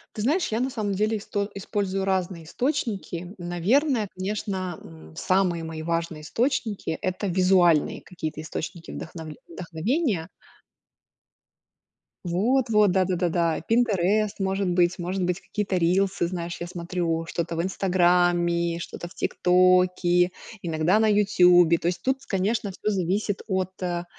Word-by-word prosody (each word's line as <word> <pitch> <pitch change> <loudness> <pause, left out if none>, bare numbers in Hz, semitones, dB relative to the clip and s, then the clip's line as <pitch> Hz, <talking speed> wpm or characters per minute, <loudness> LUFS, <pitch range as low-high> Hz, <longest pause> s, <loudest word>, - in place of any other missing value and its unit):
Ты 210 - -3
знаешь, 320 - +1
я 220 - 0
на 260 +2 0
самом 210 -5 -2
деле 215 +3 +1
исто 205 0 -3
использую 195 -1 -2
разные 185 -3 -1
источники. 195 - -3
Наверное, 210 - +1
конечно, 185 -2 -3
м, 80 -1 -14
самые 180 - +1
мои 160 -1 -6
важные 165 -1 -2
источники- 225 - -1
это 185 +2 -2
визуальные 180 -3 +3
какие-то 160 -4 -6
источники 165 +1 -6
вдохновль 160 -2 -8
вдохновения. 195 - -2 2.0
Вот 230 +9 +1
вот, 210 -3 +4
да-да-да-да, 175 -3 +1
Pinterest, 215 -3 +2
может 195 0 0
быть, 175 +1 +2
может 180 +2 -2
быть, 180 +2 -1
какие-то 205 -2 -3
рилсы, 185 +2 +2
знаешь, 170 -1 -4
я 175 - -3
смотрю 170 -1 -2
что-то 170 0 -3
в - - +1
"Инстаграме", 175 -2 +2
что-то 175 0 -7
в - - -16
"Тиктоке", 180 0 +3 0.3
иногда 165 +4 +2
на 220 - +3
"Ютубе". 180 -5 +5
То 170 - -3
есть 175 0 -1
тут, 265 +1 0
конечно, 200 +2 -1
всё 210 +3 -2
зависит 195 +2 -1
от, 190 -2 -1
э, 175 -1 -2
185 Hz, 130 wpm, -25 LUFS, 170-205 Hz, 2.0 s, Ютубе